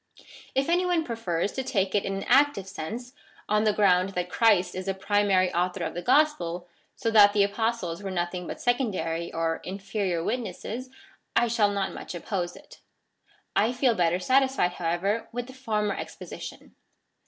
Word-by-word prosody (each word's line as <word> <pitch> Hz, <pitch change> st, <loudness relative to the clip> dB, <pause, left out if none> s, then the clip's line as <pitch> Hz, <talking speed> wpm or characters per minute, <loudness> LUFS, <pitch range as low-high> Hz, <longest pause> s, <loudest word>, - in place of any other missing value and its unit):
If 270 Hz, +1 st, +2 dB
any 350 Hz, +2 st, +3 dB
one 355 Hz, -2 st, +1 dB
prefers 205 Hz, -, -2 dB
to 265 Hz, -, -3 dB
take 195 Hz, -7 st, 0 dB
it 205 Hz, -, +1 dB
in 195 Hz, -, -2 dB
an 195 Hz, -, -4 dB
active 270 Hz, -6 st, +3 dB
sense, 230 Hz, +9 st, -6 dB, 0.3 s
on 210 Hz, +1 st, +2 dB
the 215 Hz, -, +5 dB
ground 195 Hz, -2 st, +3 dB
that 180 Hz, 0 st, -2 dB
Christ 200 Hz, -6 st, +3 dB
is 185 Hz, +1 st, -5 dB
the 195 Hz, -, 0 dB
primary 195 Hz, -2 st, +2 dB
author 180 Hz, +1 st, 0 dB
of -, -, -3 dB
the 175 Hz, -, -4 dB
gospel, 180 Hz, -, +2 dB, 0.3 s
so 225 Hz, -, -1 dB
that 205 Hz, -2 st, +7 dB
the 205 Hz, -1 st, +4 dB
Apostles 205 Hz, -4 st, -1 dB
were 195 Hz, -, -4 dB
nothing 180 Hz, -1 st, -3 dB
but -, -, -6 dB
secondary 185 Hz, -10 st, -1 dB
or 165 Hz, 0 st, -1 dB
inferior 195 Hz, -2 st, -2 dB
witnesses, 245 Hz, +2 st, -4 dB, 0.5 s
I 240 Hz, +1 st, +4 dB
shall 225 Hz, -3 st, +3 dB
not 200 Hz, -1 st, -2 dB
much -, -, -7 dB
oppose 175 Hz, 0 st, -3 dB
it. -, -, -15 dB, 0.8 s
I 220 Hz, +4 st, +3 dB
feel 245 Hz, -1 st, +3 dB
better 175 Hz, -3 st, +2 dB
satisfied, 260 Hz, -1 st, +2 dB
however, 180 Hz, +6 st, -1 dB
with 245 Hz, +1 st, -4 dB
the 260 Hz, -, -12 dB
former 215 Hz, -6 st, -1 dB
exposition. -, -, -8 dB
200 Hz, 170 wpm, -27 LUFS, 180-235 Hz, 0.8 s, that